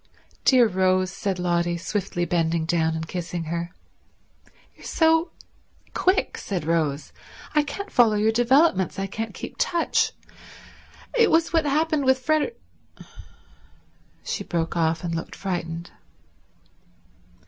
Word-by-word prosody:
"Dear 250 -3 +6
Rose," 185 -1 +1
said 195 0 -3
Lotty, 175 -1 0
swiftly 185 -1 -2
bending 165 -1 0
down 160 -1 +1
and 160 0 -4
kissing 175 -1 -4
her. 170 +2 -4 1.0
"You're - - -18
so 325 +1 +2 0.6
quick," 370 +2 +1
said 180 -6 -4
Rose. 155 -3 -1 0.4
"I 300 - +4
can't 400 +7 -6
follow 230 -4 +4
your 215 +1 +2
developments. 240 - +3
I 195 - -1
can't 225 +3 -5
keep - - -8
touch. 340 -1 +1 1.0
It 465 -2 +5
was 330 +1 +2
what 325 -2 +3
happened 305 0 +1
with 260 -1 +2
Freder—" 310 +9 +1 1.7
She - - -3
broke 165 -1 -2
off 165 -1 +1
and 170 -1 -2
looked 165 - -5
frightened. 170 -3 -4
185 Hz, 125 wpm, -24 LUFS, 170-275 Hz, 1.7 s, Dear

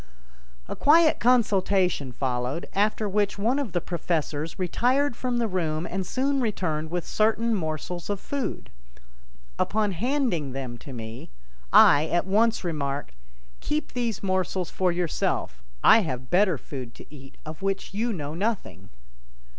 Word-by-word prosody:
A - - -5
quiet 315 +2 +5
consultation 195 - +2
followed, 125 +4 -2
after 210 +2 +1
which 205 0 0
one 235 +7 +1
of 265 -9 -3
the 175 - 0
professors 160 -2 -3
retired 250 +9 +1
from 250 0 -2
the 235 -1 +1
room 165 -4 -1
and 190 0 -3
soon 275 +3 0
returned 160 -9 -1
with 175 +1 -3
certain 225 +2 +1
morsels 170 -1 -3
of 205 -1 -1
food. 280 +3 -4 0.9
Upon 210 -1 +1
handing 205 - -1
them 130 -3 -5
to 140 - -10
me, 115 -1 -8 0.4
I 145 +2 +7
at 175 +2 +1
once 220 +4 +2
remarked: 140 - -3 0.5
"Keep 305 +1 -3
these 235 -5 -2
morsels 185 -1 -1
for 185 -1 +1
yourself; 170 - -1 0.2
I 225 - +8
have 130 - -5
better 185 -2 +4
food 130 -3 -8
to - - -12
eat, 135 -2 -13
of 155 +2 -8
which 195 0 -2
you 230 +4 0
know 150 -7 -4
nothing." 190 - -3
185 Hz, 145 wpm, -26 LUFS, 155-225 Hz, 0.9 s, I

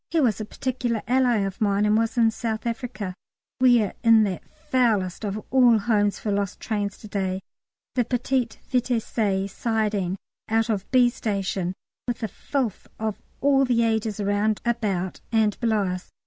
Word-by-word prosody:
He 330 - +1
was 230 -7 +2
a - - -3
particular 240 -1 -2
ally 245 -3 +3
of 195 +1 -6
mine 205 0 +2
and 210 0 +3
was 225 +2 0
in 225 -1 +5
South 220 0 -3
Africa. 230 -5 -3 0.5
We 245 -3 +6
are 200 - -3
in 225 -1 +7
that 190 -4 -2
foulest 240 - 0
of 205 0 -2
all 245 -3 +6
homes 205 -1 +1
for 210 - -3
lost 200 -2 -1
trains 205 -3 -2
to 215 - -11
day, 190 -2 -2 0.5
the 250 - +2
Petit 245 +1 0 0.2
Vitesse 220 -6 0
siding 210 -5 0 0.3
out 225 +1 +2
of 195 -2 -3
B. 250 -1 +5
station, 195 -5 -2 0.3
with 245 -1 -2
the 220 - -1
filth 240 +1 -3
of 220 -2 -3 0.2
all 275 -1 +4
the 240 -3 +2
ages 220 -2 0
around, 205 +1 +1
about, 205 -6 -1
and 220 -2 +2
below 220 -3 +2
us. 180 -1 -4
220 Hz, 165 wpm, -25 LUFS, 205-240 Hz, 0.5 s, in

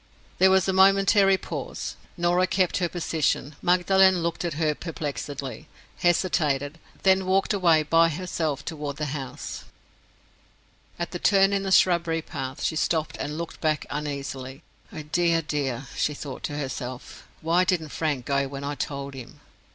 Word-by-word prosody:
There 190 - +7
was 190 -1 +4
a 190 - +1
momentary 195 +1 +5
pause. - - -5 0.2
Norah 175 +1 +2
kept 185 -1 +1
her 175 -3 0
position. 160 -4 -1
Magdalen 185 0 +4
looked 170 +1 -2
at 170 -4 -2
her 155 -1 +1
perplexedly—hesitated—then 150 - -1
walked 195 +2 +2
away 170 -6 +4
by 165 +2 +4
herself 160 -3 -3
toward 150 -3 -5
the 150 - -2
house. 135 -4 -6 1.3
At 175 - -4
the 175 - -4
turn 195 0 +4
in 200 - +1
the 195 0 -3
shrubbery 170 -3 +3
path 130 -3 -6
she 160 - 0
stopped 155 0 0
and 150 +1 -4
looked 170 -1 -6
back 155 -1 0
uneasily. 140 -1 -5 0.3
"Oh, 155 - -7
dear, 165 +2 +1
dear!" 135 -4 -2
she 150 - 0
thought 140 -2 -7
to 145 - -4
herself, 130 -3 -6
"why 170 +3 +3
didn't 175 -4 0
Frank 145 -5 -2
go 140 -1 +1
when 140 0 -7
I 145 +1 -2
told 140 0 -4
him?" 130 -3 -10
160 Hz, 150 wpm, -25 LUFS, 145-180 Hz, 1.3 s, There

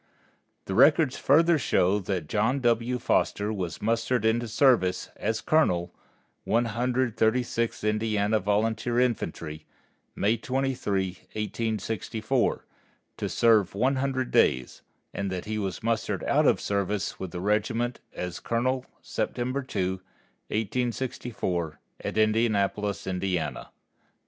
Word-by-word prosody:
The 95 - -4
records 140 - +5
further 165 +3 +4
show 100 -5 +2
that 95 -4 -3
John 110 - +1
W. 120 +1 +1
Foster 105 -3 0
was 90 -4 -4
mustered 115 +1 +1
into 115 +1 +2
service 110 -6 +2
as 110 +1 -2
colonel, 90 - +2 0.5
One 120 +1 +2
Hundred 120 +1 0
Thirty 110 +3 +3
sixth 115 -2 -2
Indiana 105 0 +1
Volunteer 110 +4 0
Infantry, 85 -10 -2 0.5
May 110 +4 +2
23, 125 -7 -1 0.2
1864, 110 +2 -1 0.5
to - - -3
serve 110 -5 +3
one 130 +6 +2
hundred 130 -1 -1
days, 65 -1 +2 0.3
and 100 -1 -3
that 90 -1 -4
he 110 0 -2
was 95 -3 -4
mustered 115 0 -1
out - - +3
of - - +4
service 100 0 -2
with 95 - -4
the 90 - -6
regiment 110 +5 0
as 90 -1 -5
colonel 125 +2 -1 0.2
September 130 +3 -2
2, 95 -7 -2 0.5
1864, 110 - -2 0.2
at - - -4
Indianapolis, 105 -2 +1
Indiana. 90 -2 -2
110 Hz, 120 wpm, -27 LUFS, 100-125 Hz, 0.5 s, records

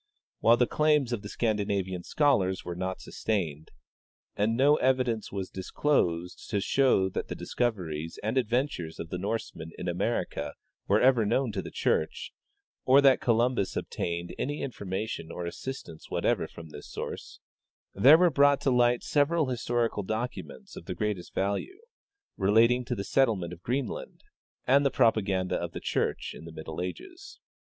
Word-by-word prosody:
While 115 +1 +5
the 125 - +4
claims 150 -2 +2
of 115 - -2
the 100 - -8
Scandinavian 100 -5 -1
scholars 100 - +1
were 90 - -4
not 95 +1 -3
sustained, 80 -8 -3 0.7
and 110 +3 +1
no 145 +3 +5
evidence 125 -4 +1
was 95 -2 -4
disclosed 90 - -1
to 100 - 0
show 105 -2 +3
that - - -4
the - - -5
discoveries 85 -10 -3
and 110 +4 -1
adventures 120 - -1
of 80 - -6
the 90 - -4
Norsemen 100 -5 -4
in 90 - -5
America 95 +7 -2 0.3
were 100 +2 +4
ever 125 -3 +4
known 120 +3 +1
to - - -3
the - - -8
church, 475 +1 -1 0.5
or 130 +2 +6
that 135 -2 +5
Columbus 115 -3 +1
obtained 85 0 -3
any 145 +2 -2
information 100 -7 -4
or 90 - -5
assistance 85 -3 -7
whatever - - 0
from 80 -1 -11
this 75 - -10
source, - - -7 0.5
there 135 +10 +8
were 175 0 +4
brought 140 0 +4
to 135 - +2
light 120 -1 +3
several 150 0 +2
historical 120 -3 -1
docu 110 +5 -3
ments 205 -2 -13
of - - -9
the - - -5
greatest 105 -5 -3
value, 100 - -1 0.6
relating 115 +5 +4
to 125 - -2
the 100 - -4
settlement 100 -9 +1
of 85 - -12
Green 130 +6 -1
land - - -8 0.4
and 140 +3 +5
the 140 - +3
propaganda 105 -7 +2
of - - -5
the - - -5
church - - -1
in 80 - -11
the 85 - -9
middle 80 +1 -6
ages. 360 - -8
110 Hz, 160 wpm, -28 LUFS, 95-130 Hz, 0.7 s, there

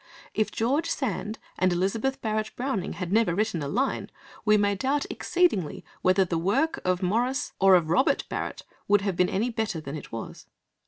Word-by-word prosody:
If 215 - +1
George 265 +8 0
Sand 220 -4 -2 0.2
and 185 0 +3
Elizabeth 215 +9 0
Barrett 215 -1 -1
Browning 245 -7 -2
had 180 0 -4
never 215 -6 +3
written 210 -5 0
a 140 - -3
line, 250 - -1 0.3
we 210 -1 +5
may 205 0 +2
doubt 270 +8 0
exceedingly 340 - 0 0.2
whether 185 +1 +4
the 170 -2 -1
work 260 - +1
of 185 +1 0
Maurice 245 +9 0
or 195 -1 +7
of 165 -3 +2
Robert 190 +11 +3
Barrett - - -4 0.2
would 205 0 +4
have 195 -2 -1
been 180 +1 +2
any 225 +6 0
better 220 -6 -2
than 145 -1 -6
it 150 - -8
was. 115 - -7
205 Hz, 180 wpm, -27 LUFS, 180-235 Hz, 0.3 s, or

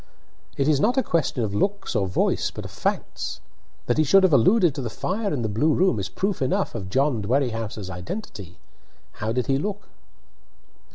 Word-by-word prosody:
"It 140 - +1
is 150 -3 +3
not 240 - +2
a 265 - +3
question 165 - 0
of 100 -2 -2
looks 195 - -1
or 95 - +1
voice, 90 - +1
but - - -8
of - - -8
facts. - - -3 0.5
That - - +1
he - - +5
should 195 +7 +5
have 185 -5 +4
alluded 175 - +5
to 140 - -4
the 120 - -3
fire 200 - -2
in 135 -6 -1
the - - 0
blue 145 +10 +2
room 180 - +2
is 95 0 -3
proof 195 - -2
enough 130 - 0
of 100 -5 -5
John 135 +1 +1
Dwerrihouse's 115 -3 -1
identity. 90 - -7 0.6
How 110 +1 -1
did 125 0 0
he 135 +2 +1
look?" 205 +4 -4
135 Hz, 190 wpm, -24 LUFS, -, 0.6 s, he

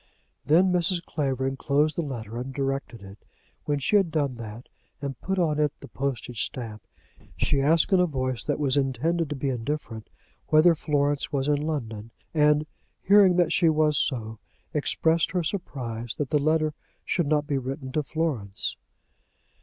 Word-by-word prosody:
Then 175 +5 +4
Mrs. 175 0 +2
Clavering 135 -3 -1
closed 150 +2 +1
the - - 0
letter 120 -6 -5
and 130 +2 -5
directed 135 -4 -3
it. 95 +1 -13 0.4
When 145 - 0
she 140 +9 +3
had 195 -4 +2
done 145 -4 0
that, 115 +1 -8 0.3
and 135 -3 -5
put 190 +1 -2
on 155 -4 +1
it 150 -1 +2
the 140 - -11
postage 125 -5 -3
stamp, 110 -4 -5 0.6
she 140 - +1
asked 160 +6 +3
in 190 - +6
a 180 - +4
voice 130 -5 -2
that 145 - 0
was 145 -2 +1
intended 140 +5 0
to 150 - -3
be 135 0 -2
indifferent 120 -3 -4 0.4
whether 155 +3 +6
Florence 145 -2 0
was 140 -1 0
in 145 -1 +2
London; 115 -8 -4 0.2
and, 150 -1 +4 0.4
hearing 195 -2 +6
that 175 -2 +3
she 170 - +4
was 155 -1 +2
so, 110 -6 -1 0.3
expressed 160 +1 +2
her 180 -2 +1
surprise 120 - -4
that 145 -1 -3
the 150 - +3
letter 155 0 +2 0.3
should 170 -5 0
not 150 0 +2
be 140 -2 -1
written 130 +1 -5
to 155 - 0
Florence. 135 -10 -2
145 Hz, 170 wpm, -26 LUFS, 130-155 Hz, 0.6 s, in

